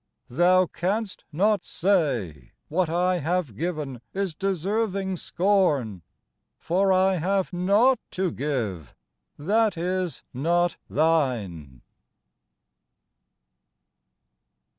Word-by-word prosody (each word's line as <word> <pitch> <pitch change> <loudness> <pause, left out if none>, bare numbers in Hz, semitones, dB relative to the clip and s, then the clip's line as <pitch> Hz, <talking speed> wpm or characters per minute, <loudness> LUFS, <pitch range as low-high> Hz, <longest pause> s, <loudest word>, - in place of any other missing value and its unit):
Thou 180 +7 +4
canst 195 +5 -3
not 205 +6 +2
say 130 - -1 0.2
What 175 +1 +1
I 180 +2 +1
have 160 - -1
given 150 - -4
is 195 -3 -1
deserving 195 +2 -1
scorn, 165 - +1 0.6
For 190 +3 +1
I 190 0 +3
have 190 +3 0
naught 205 +8 +3
to 185 -2 -1
give 115 - -3 0.4
that 205 +5 +1
is 180 0 -2
not 170 +6 +1
Thine. 115 - 0
175 Hz, 85 wpm, -25 LUFS, 145-190 Hz, 0.6 s, Thou